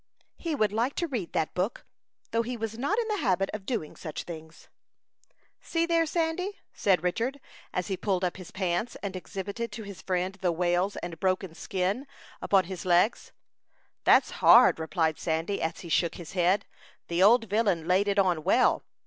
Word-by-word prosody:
He 330 Hz, -3 st, -2 dB
would 215 Hz, -6 st, +1 dB
like 235 Hz, +5 st, 0 dB
to 340 Hz, -, -1 dB
read 235 Hz, -, -4 dB
that 160 Hz, -3 st, 0 dB
book, 190 Hz, +6 st, -2 dB, 0.5 s
though 230 Hz, -, +2 dB
he 240 Hz, +1 st, -4 dB
was 225 Hz, 0 st, -4 dB
not 280 Hz, -, -1 dB
in 470 Hz, -2 st, 0 dB
the 425 Hz, -2 st, -1 dB
habit 195 Hz, -2 st, +1 dB
of 210 Hz, -2 st, -6 dB
doing 220 Hz, -12 st, -3 dB
such 155 Hz, -4 st, -6 dB
things. 160 Hz, -1 st, -10 dB, 0.9 s
"See 335 Hz, 0 st, 0 dB
there, 335 Hz, -1 st, +2 dB
Sandy," 345 Hz, +5 st, -1 dB, 0.2 s
said 190 Hz, -3 st, +2 dB
Richard, 230 Hz, +10 st, -1 dB, 0.3 s
as 180 Hz, -, -2 dB
he 195 Hz, -, -2 dB
pulled 185 Hz, 0 st, -1 dB
up 180 Hz, 0 st, -1 dB
his 185 Hz, -2 st, -10 dB
pants, 185 Hz, +4 st, -2 dB
and 195 Hz, -2 st, -4 dB
exhibited 200 Hz, +5 st, -5 dB
to 220 Hz, 0 st, -6 dB
his 200 Hz, -5 st, -9 dB
friend 185 Hz, +1 st, -1 dB
the 180 Hz, -2 st, +2 dB
wales 175 Hz, +3 st, +1 dB
and 170 Hz, -1 st, -6 dB
broken 185 Hz, -2 st, 0 dB
skin 195 Hz, -, -2 dB, 0.3 s
upon 195 Hz, -2 st, +3 dB
his 185 Hz, 0 st, -7 dB
legs. 180 Hz, +5 st, +2 dB, 0.7 s
"That's -, -, +5 dB
hard," -, -, +7 dB
replied 160 Hz, -1 st, 0 dB
Sandy, 165 Hz, +4 st, -1 dB
as 160 Hz, -, -2 dB
he 170 Hz, -, -9 dB
shook 170 Hz, +1 st, +1 dB
his 170 Hz, -3 st, -9 dB
head. 190 Hz, +2 st, +2 dB, 0.4 s
"The 170 Hz, +1 st, 0 dB
old 225 Hz, +5 st, +6 dB
villain 200 Hz, -6 st, +1 dB
laid 190 Hz, +3 st, +3 dB
it 200 Hz, 0 st, +1 dB
on 180 Hz, -5 st, +2 dB
well." -, -, +3 dB
190 Hz, 185 wpm, -28 LUFS, 175-230 Hz, 0.9 s, hard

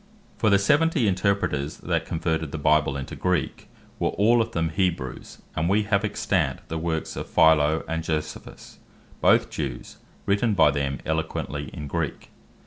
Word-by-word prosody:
For 110 Hz, -, +2 dB
the 100 Hz, -, +5 dB
seventy 145 Hz, +4 st, +3 dB
Interpreters 95 Hz, -7 st, 0 dB
that -, -, -2 dB
converted 80 Hz, -2 st, -2 dB
the -, -, -4 dB
Bible 75 Hz, -1 st, +2 dB
into 70 Hz, -, -6 dB
Greek, 90 Hz, -3 st, -1 dB, 0.3 s
were -, -, +1 dB
all 115 Hz, +4 st, +3 dB
of 110 Hz, -, -2 dB
them 80 Hz, -1 st, -1 dB
Hebrews; 85 Hz, -7 st, -3 dB
and 80 Hz, +3 st, 0 dB
we 105 Hz, +2 st, +3 dB
have 105 Hz, -1 st, +1 dB
extant 95 Hz, -9 st, -1 dB
the 80 Hz, -, -3 dB
works 80 Hz, -1 st, -3 dB
of -, -, -6 dB
Philo 80 Hz, -1 st, +4 dB
and 80 Hz, 0 st, -2 dB
Josephus 80 Hz, -1 st, -5 dB, 0.4 s
both -, -, +4 dB
Jews, 70 Hz, -5 st, -5 dB, 0.3 s
written 100 Hz, +2 st, +1 dB
by 75 Hz, -, +5 dB
them 70 Hz, -1 st, -2 dB
eloquently 75 Hz, -3 st, -3 dB
in 75 Hz, -, -7 dB
Greek. 80 Hz, +2 st, -4 dB
80 Hz, 155 wpm, -25 LUFS, 75-100 Hz, 0.4 s, the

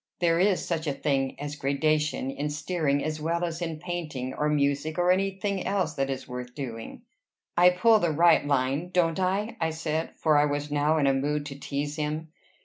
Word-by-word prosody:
There 170 Hz, -1 st, +3 dB
is 190 Hz, 0 st, +2 dB
such 165 Hz, -2 st, -2 dB
a 145 Hz, -, +1 dB
thing 135 Hz, -2 st, -1 dB
as 145 Hz, 0 st, -5 dB
gradation 150 Hz, 0 st, 0 dB
in 145 Hz, +2 st, -3 dB
steering 145 Hz, -1 st, -1 dB
as 155 Hz, 0 st, -3 dB
well 170 Hz, +2 st, 0 dB
as 170 Hz, 0 st, -5 dB
in 165 Hz, -2 st, -3 dB
painting, 155 Hz, -7 st, -4 dB
or 150 Hz, +2 st, 0 dB
music, 145 Hz, +2 st, 0 dB
or 175 Hz, 0 st, +3 dB
any 195 Hz, +2 st, +2 dB
thing 195 Hz, 0 st, -3 dB
else 185 Hz, -5 st, 0 dB
that 135 Hz, -2 st, -1 dB
is 135 Hz, -1 st, -4 dB
worth 125 Hz, 0 st, -7 dB
doing." 115 Hz, -6 st, -7 dB, 0.5 s
"I 180 Hz, +1 st, +7 dB
pull 215 Hz, +5 st, +4 dB
the 175 Hz, -, +1 dB
right 170 Hz, +3 st, +5 dB
line, 140 Hz, +4 st, 0 dB
don't 175 Hz, -1 st, +1 dB
I?" 195 Hz, +4 st, -1 dB
I 160 Hz, -, +2 dB
said; 160 Hz, 0 st, -3 dB
for 155 Hz, -2 st, +3 dB
I 145 Hz, -, +4 dB
was 145 Hz, 0 st, -2 dB
now 150 Hz, +2 st, +2 dB
in 145 Hz, -, +2 dB
a 135 Hz, -, +4 dB
mood 145 Hz, +2 st, -1 dB
to 140 Hz, -2 st, -6 dB
tease 145 Hz, +2 st, -3 dB
him. 155 Hz, +1 st, -3 dB
155 Hz, 205 wpm, -27 LUFS, 145-175 Hz, 0.5 s, I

